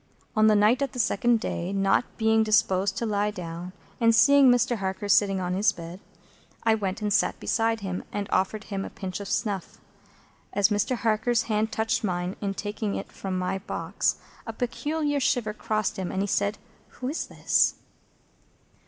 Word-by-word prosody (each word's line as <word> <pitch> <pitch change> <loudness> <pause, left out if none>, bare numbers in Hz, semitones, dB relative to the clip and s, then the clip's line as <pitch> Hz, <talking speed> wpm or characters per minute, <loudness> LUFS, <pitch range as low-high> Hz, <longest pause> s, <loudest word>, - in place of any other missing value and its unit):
On 215 0 +5
the 215 - +5
night 215 +6 +4
of 275 -3 -1
the - - -8
second 235 0 +2
day, 180 -4 -3
not 195 +4 +2
being 220 0 +3
disposed 205 -3 +2
to 235 - -1
lie 210 -1 0
down, 175 -2 -6 0.3
and 230 -1 +4
seeing 275 +5 +6
Mr. 245 -1 +3
Harker 195 +1 -3
sitting 195 -1 +3
on 180 -1 -2
his 200 +3 +3
bed, 170 -1 -9 0.6
I 225 - +4
went 210 0 -2
and 205 -1 +1
sat - - +1
beside 225 -1 0
him, 185 -2 -4
and 205 -1 -3
offered 200 +3 0
him 195 -2 -4
a - - -6
pinch 185 -1 -6
of 200 - -6
snuff. 200 -4 -2 0.8
As 205 0 +3
Mr. 210 +4 +1
Harker's 225 +1 +1
hand 220 0 0
touched 225 +3 0
mine 180 -1 -2
in 200 -1 -2
taking 210 0 -3
it - - -6
from 190 -1 -4
my 185 +1 -1
box, 190 - -1 0.3
a 225 - -4
peculiar 290 +5 -1
shiver 235 -5 0
crossed 215 0 -2
him, 185 - -3
and 190 - -1
he - - -2
said, 205 +1 0 0.4
"Who 255 - -5
is 295 +5 -3
this?" - - +2
210 Hz, 180 wpm, -26 LUFS, 195-225 Hz, 0.8 s, seeing